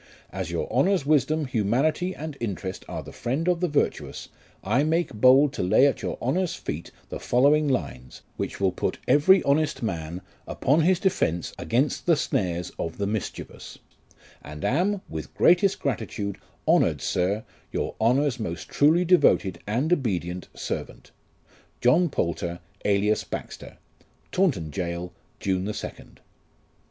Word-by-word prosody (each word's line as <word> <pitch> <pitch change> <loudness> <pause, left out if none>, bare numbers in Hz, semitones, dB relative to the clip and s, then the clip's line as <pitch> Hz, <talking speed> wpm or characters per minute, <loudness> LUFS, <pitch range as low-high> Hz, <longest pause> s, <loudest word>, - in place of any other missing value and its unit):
As 95 -3 -4
your 85 -1 -2
Honour's 180 +4 +2
wisdom, 150 +1 +2
humanity, 130 - 0
and 155 -1 -6
interest 95 -4 -4
are - - -5
the - - -10
friend 140 +8 -2
of 180 -1 +2
the 180 - +1
virtuous, 150 -3 -2 0.3
I 115 +8 +2
make 165 +3 0
bold 130 +6 +5
to - - -3
lay 90 +9 +4
at 140 - +1
your - - -3
Honour's 170 +8 0
feet 80 +4 -5 0.2
the - - -5
following 145 +5 +3
lines, 70 - -3
which - - -4
will 95 -1 +2
put 90 - -2
every 185 +7 +5
honest 145 -1 +1
man 85 -3 -3 0.3
upon 145 +5 +2
his 180 +2 +3
defence 130 - 0
against 130 +9 0
the 170 - +6
snares 90 - -1
of 80 - -4
the 100 - -1
mischievous; 105 -1 -5 0.6
and 75 +1 -7
am, 185 +8 +1
with 80 -1 -7
greatest 180 +3 +4
gratitude, 100 -6 -3 0.3
honoured - - +3
Sir, 100 +5 0 0.3
your - - -2
Honour's 130 +3 +2
most 85 -7 -5
truly 160 +5 +4
devoted 165 - +3
and 130 +11 +1
obedient 90 - -2
servant, - - -6 0.3
" - - -31
JOHN 160 +8 +4
POTJLTEE, 85 -6 -2 0.3
alias 105 +1 +2
BAXTEB. - - -7 0.5
"Taunton 130 - +1
Gaol, 85 +1 -4 0.3
June 95 -1 -1
2nd." 105 - -7
125 Hz, 145 wpm, -25 LUFS, 95-155 Hz, 0.6 s, the